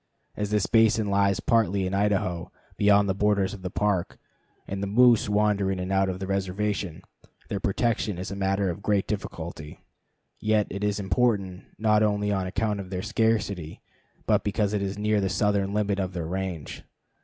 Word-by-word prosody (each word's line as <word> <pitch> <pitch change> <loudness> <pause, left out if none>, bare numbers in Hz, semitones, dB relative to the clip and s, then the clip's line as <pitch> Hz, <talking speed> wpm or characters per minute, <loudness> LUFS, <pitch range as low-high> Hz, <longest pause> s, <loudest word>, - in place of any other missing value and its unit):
As 105 -1 -2
this 105 -2 +1
basin 110 -2 +3
lies 100 -1 +2
partly 100 -4 +2
in 95 - -3
Idaho, 95 -3 0 0.2
beyond 100 0 +4
the 95 - +1
borders 100 -1 +1
of 100 - -9
the 90 - -4
Park, 100 -2 -1 0.5
and 95 0 -4
the 100 - -2
moose 115 +1 +4
wander 105 -2 +2
in 95 - -2
and 90 +1 -4
out 95 0 +2
of 90 - -3
the 95 - -5
reservation, 95 -2 -2 0.5
their 100 - -2
protection 105 -1 0
is 90 +2 -5
a - - -4
matter 95 -1 0
of 95 - -8
great 100 -1 +1
difficulty; 85 -6 -6 0.6
yet 110 -1 +2
it 100 +1 -4
is 105 0 0
important, 95 -2 0
not 105 -1 +3
only 105 -1 +1
on 95 -2 -1
account 105 +1 -1
of 95 -2 -7
their 90 -1 -4
scarcity, 105 -7 -1 0.5
but - - +2
because 105 0 0
it 105 - 0
is 100 0 -3
near 105 0 +1
the 95 - 0
southern 100 +1 +1
limit 100 -1 0
of 95 -1 -2
their 85 -3 -3
range. 90 -3 -4
100 Hz, 185 wpm, -26 LUFS, 95-105 Hz, 0.6 s, beyond